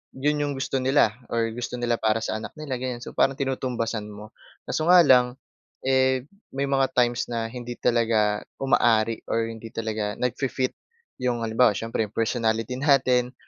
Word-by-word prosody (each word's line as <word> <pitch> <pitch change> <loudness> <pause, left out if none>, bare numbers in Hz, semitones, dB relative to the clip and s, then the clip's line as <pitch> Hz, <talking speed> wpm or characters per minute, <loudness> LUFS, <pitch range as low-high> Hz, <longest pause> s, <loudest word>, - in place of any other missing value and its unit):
'yon 150 +3 0
'yong 145 -1 -1
gusto 135 0 -2
nila 130 -3 +3 0.2
or 115 -1 +1
gusto 120 +2 -5
nila 120 -1 +1
para 110 0 +1
sa 110 - -2
anak 110 - -8
nila, 150 -4 -4
ganyan. 125 -1 -4
So, - - -8
parang 135 - +3
tinutumbasan 120 -5 -2
mo. 105 +1 -11 0.3
Kaso 155 - -2
nga 180 0 +8
lang, 125 -4 +4 0.5
eh, 130 -1 +2 0.3
may 140 0 -1
mga 135 -1 +3
times 120 -1 +1
na 115 -1 -3
hindi 120 -1 -6
talaga 110 -3 +1 0.2
umaari 115 -4 +3
or 115 0 0
hindi 115 0 -9
talaga 110 -2 -2
nagfi-fit 130 +1 -1 0.5
'yong 125 -2 -1
halimbawa, 115 0 +3
siyempre 115 0 -2
'yong 105 - -16
personality 115 0 0
natin, 130 -3 +3
120 Hz, 165 wpm, -25 LUFS, 115-130 Hz, 0.5 s, nga